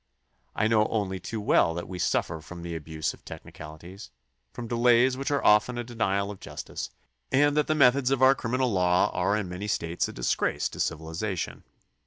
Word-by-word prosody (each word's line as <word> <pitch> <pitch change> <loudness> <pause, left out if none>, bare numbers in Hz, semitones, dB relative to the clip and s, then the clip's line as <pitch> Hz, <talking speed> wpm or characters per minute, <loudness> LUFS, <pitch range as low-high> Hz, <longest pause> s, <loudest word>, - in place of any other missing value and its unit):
I 110 - +2
know 110 -1 +3
only 95 -4 -2
too 110 +5 -5
well 85 -5 +3
that 85 - -5
we 90 -1 -7
suffer 80 -1 0
from 85 +2 -10
the 85 -1 -5
abuse 80 0 -3
of - - -18
technicaHties, 85 +6 -10 0.4
from 120 - -7
delays 120 +2 +4
which 135 +1 -3
are 145 -1 0
often 105 +4 +4
a 120 - -2
denial 105 -4 -1
of 100 - -10
justice, - - -7 0.4
and 145 +2 +3
that 150 -1 +2
the 155 - +1
methods 130 -2 +4
of 135 -1 +1
our 130 +1 +8
criminal 130 0 -1
law 90 -2 +2
are 95 +4 +1
in 105 -3 -3
many 90 +4 -5
States 85 -4 -1
a - - -7
disgrace - - 0
to - - -11
civilization. 85 +4 -3
105 Hz, 190 wpm, -27 LUFS, 90-125 Hz, 0.4 s, our